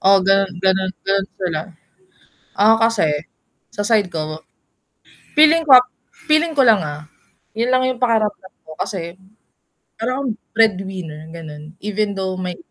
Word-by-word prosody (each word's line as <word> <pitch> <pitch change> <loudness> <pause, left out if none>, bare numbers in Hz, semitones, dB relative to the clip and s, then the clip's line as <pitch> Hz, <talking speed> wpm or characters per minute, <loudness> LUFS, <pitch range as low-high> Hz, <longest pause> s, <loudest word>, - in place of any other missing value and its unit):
Oo 195 0 +5
ganon 195 0 +3 0.2
ganon 190 0 +2
ganon 195 0 0
sila. 175 -5 -2 1.0
ako 210 +3 +5
kasi, 210 -8 +1 0.6
sa 205 - -3
side 210 -3 +2
ko, 155 -1 -4 1.0
feeling 315 +2 +6
ko 265 -3 +10
ah, 250 - 0 0.4
feeling 310 +1 +2
ko - - +7
lang 220 -4 +5
ah, 150 0 -7 0.5
yun 235 +3 -1
lang 255 0 +2
yung 255 -2 -3
pakiramdam 215 -5 0
ko 160 - -11
kasi, 170 -4 -4 0.9
para 250 +3 -2
kang 270 -4 -2 0.2
breadwinner 190 -8 -1
ganon, 155 -1 -10
even 210 0 -2
though 190 -1 -2
may 180 -1 -4
195 Hz, 140 wpm, -19 LUFS, 175-230 Hz, 1.0 s, ko